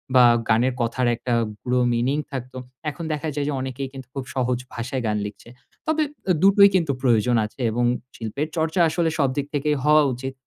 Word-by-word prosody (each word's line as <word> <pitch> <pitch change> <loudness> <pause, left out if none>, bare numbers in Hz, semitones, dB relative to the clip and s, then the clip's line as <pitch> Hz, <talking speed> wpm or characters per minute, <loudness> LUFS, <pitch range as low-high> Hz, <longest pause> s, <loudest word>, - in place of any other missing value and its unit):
বা 125 -1 +8 0.2
গানের 120 +4 +3
কথার 120 +2 0
একটা 120 +1 -3 0.3
গূঢ় 125 0 0
মিনিং 125 +5 +1
থাকতো। 130 -1 -6 0.3
এখন 150 +3 -7
দেখা 150 +1 -3
যায় 145 -1 -1
যে 150 - -1
অনেকেই 130 +1 -4
কিন্তু 130 -2 -9
খুব 135 -2 -4
সহজ 125 -1 +1 0.2
ভাষায় 120 +2 -3
গান 105 0 0
লিখছে। 105 +3 -9 0.4
তবে 315 0 +2 0.3
এ - - +5
দুটোই 200 0 +7
কিন্তু 165 -6 +2
প্রয়োজন 120 -1 +3
আছে 115 +5 -9
এবং 120 +2 0 0.3
শিল্পের 140 +7 -3
চর্চা 160 +2 0
আসলে 165 0 0
সবদিক 140 0 +1
থেকেই 150 +1 +1
হওয়া 150 0 +6
উচিত। 130 +2 -5
130 Hz, 185 wpm, -23 LUFS, 120-150 Hz, 0.4 s, বা